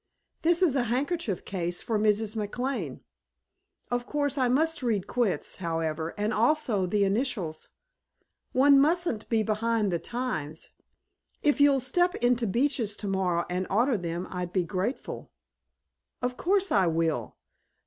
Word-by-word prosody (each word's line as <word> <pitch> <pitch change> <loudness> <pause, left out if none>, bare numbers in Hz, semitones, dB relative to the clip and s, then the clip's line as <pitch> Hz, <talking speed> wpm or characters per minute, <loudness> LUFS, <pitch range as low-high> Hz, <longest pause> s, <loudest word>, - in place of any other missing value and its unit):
This 340 +2 +3
is 310 -7 +3
a 250 -3 +2
handkerchief 255 - -1
case 175 -2 -3
for 220 -2 0
Mrs. 215 +1 +1
McLane. 245 +6 -3 0.9
Of 245 0 -1
course 285 -2 0
I 260 -3 +2
must 315 +5 +1
read 220 -7 0
'Quits,' 240 -6 -1
however, 165 -2 -2
and 210 +2 0
also 230 -5 +2
'The 205 +2 +2
Initials.' 195 - -1 0.8
One 275 +2 +6
mustn't 325 -7 +1
be 225 -2 +2
behind 215 -1 0
the 170 - 0
times. 235 - -4 0.7
If 295 -1 +3
you'll 285 -1 +5
step 350 +8 +1
into 245 -1 +1
Beach's 235 -1 0
tomorrow 190 -4 -1
and 180 +1 -2
order 235 +6 +2
them 175 -1 -3
I'll 180 -1 -3
be 180 +1 0
grateful." 195 - -4 0.9
"Of 250 0 -1
course 390 +4 +1
I 190 -3 +4
will. 160 -8 -1
225 Hz, 140 wpm, -28 LUFS, 185-270 Hz, 0.9 s, One